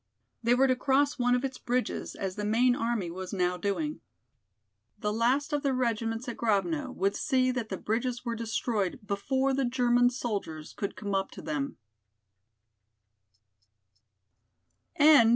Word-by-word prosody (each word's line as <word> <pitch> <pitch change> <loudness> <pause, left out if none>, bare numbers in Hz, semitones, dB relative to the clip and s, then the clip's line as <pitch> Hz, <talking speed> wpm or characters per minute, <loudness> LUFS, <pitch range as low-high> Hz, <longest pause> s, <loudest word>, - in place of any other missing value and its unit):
They 240 +1 +3
were 265 +2 +4
to 260 -1 +3
cross 275 +2 +2
one 245 0 +3
of 250 +2 0
its 265 -1 -5
bridges, 250 +1 -2
as 190 -2 -3
the 210 - -4
main 240 +4 +3
army 230 -8 -1
was 185 +1 -6
now 180 -2 +1
doing. 205 - -2 1.0
The 210 0 -1
last 255 +7 +1
of 290 - +1
the 275 -2 +1
regiments 230 -1 -1
at 240 - -4
Grovno 195 -9 0
would 200 +1 +1
see 255 -2 +2
that 245 -3 -3
the 190 - -3
bridges 240 +4 -2
were 235 - -1
destroyed 220 -2 -1
before 265 +7 0
the 270 +1 +1
German 245 -1 +3
soldiers 200 -11 -4
could 200 - -4
come 200 -1 -4
up 195 0 0
to - - -8
them. 145 -2 -3
235 Hz, 150 wpm, -29 LUFS, 200-255 Hz, 1.0 s, were